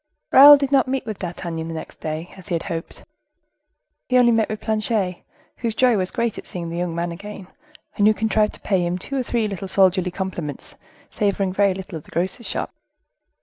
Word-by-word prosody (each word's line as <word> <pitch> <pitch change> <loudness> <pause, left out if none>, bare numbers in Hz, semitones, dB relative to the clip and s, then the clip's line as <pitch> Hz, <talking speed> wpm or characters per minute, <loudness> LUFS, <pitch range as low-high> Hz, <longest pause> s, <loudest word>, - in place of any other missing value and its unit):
Raoul 290 +2 +10
did 275 -1 -2
not 270 -3 +4
meet 265 0 -2
with 215 -3 -5
D'Artagnan 170 -2 -5
the 165 - -5
next 160 - -8
day, 155 +2 -5
as 190 0 -12
he 175 - -1
had 165 - -2
hoped. 165 -2 -6 1.1
He 255 - +4
only 240 -1 +5
met 225 -1 +2
with 215 -1 -4
Planchet, 215 -4 -1 0.4
whose 230 -2 -2
joy 250 -1 +4
was 185 -2 -1
great 235 -2 -2
at - - -11
seeing 170 -2 -5
the 170 - -4
young 175 -2 -2
man 170 0 -2
again, 195 +2 -9 0.5
and 205 -1 +4
who 215 - +6
contrived 215 -1 +1
to - - -15
pay 190 -3 +1
him 175 +1 -1
two 275 +9 -6
or 265 - +1
three 235 -3 -1
little 195 -1 -5
soldierly 185 -1 +3
compliments, 175 -6 -5 0.4
savoring 200 -2 0
very 200 -1 +2
little 185 -3 -7
of - - -18
the - - -18
grocer's 185 +7 -2
shop. - - -3
195 Hz, 210 wpm, -22 LUFS, 175-220 Hz, 1.1 s, Raoul